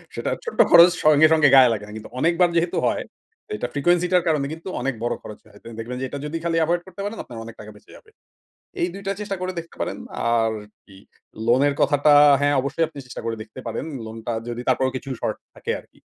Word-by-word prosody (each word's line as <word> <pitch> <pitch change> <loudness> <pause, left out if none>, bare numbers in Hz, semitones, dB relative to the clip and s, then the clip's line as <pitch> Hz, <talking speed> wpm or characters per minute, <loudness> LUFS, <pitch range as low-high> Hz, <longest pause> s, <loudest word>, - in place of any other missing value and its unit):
সেটা - - -3
ছোট্ট 460 - -7
খরচ 170 +1 +9
সঙ্গে, 155 0 +6
সঙ্গে, 150 -3 +5
গায়ে 130 -3 +7
লাগে 105 -1 -5
না - - -11
কিন্তু 110 - -10
অনেকবার 170 +3 +3
যেহেতু 170 +1 0
হয় - - -1 0.5
এটা 120 - -3
ফ্রিকোয়েন্সি 175 +4 +2
টার 180 -2 +4
কারণে 150 -3 +1
কিন্তু 165 +4 -8
অনেক 135 +1 -1
বড় 120 - 0
খরচ 105 - -10
হয়। 100 -1 -18
তো - - -40
দেখবেন 120 +3 -5
যে, 130 - -1
এটা 145 - -5
যদি 155 +2 -3
খালি 165 -1 0
এভয়েড 175 +2 0
করতে 190 +1 -9
পারেন 210 +2 -4
আপনার 115 -3 -9
অনেক 115 0 -10
টাকা 110 0 -10
বেঁচে 105 - -19
যাবে। - - -21 0.7
এই 175 - +2
২ 195 - -8
টা 195 - +1
চেষ্টা 200 -2 -3
করে 185 0 -3
দেখতে 165 0 -9
পারেন। - - -3 0.4
আর 115 -1 +1 0.3
কি 95 -2 -16 0.5
লোন 120 +2 +4
এর 140 - -1
কথাটা 145 +1 +4 0.3
হ্যাঁ, 145 0 +2
অবশ্যই 160 +4 0
আপনি 150 -3 -13
চেষ্টা 125 - -8
করে 115 -1 -2
দেখতে 110 +4 -11
পারেন। - - -4 0.2
লোন 110 - -8
টা 120 - -1 0.2
যদি 120 +1 -4
তারপরও 130 +1 +1
কিছু 135 - -7
শর্ট - - -2 0.2
থাকে - - -6
আরকি। - - -26
145 Hz, 230 wpm, -22 LUFS, 120-170 Hz, 0.7 s, খরচ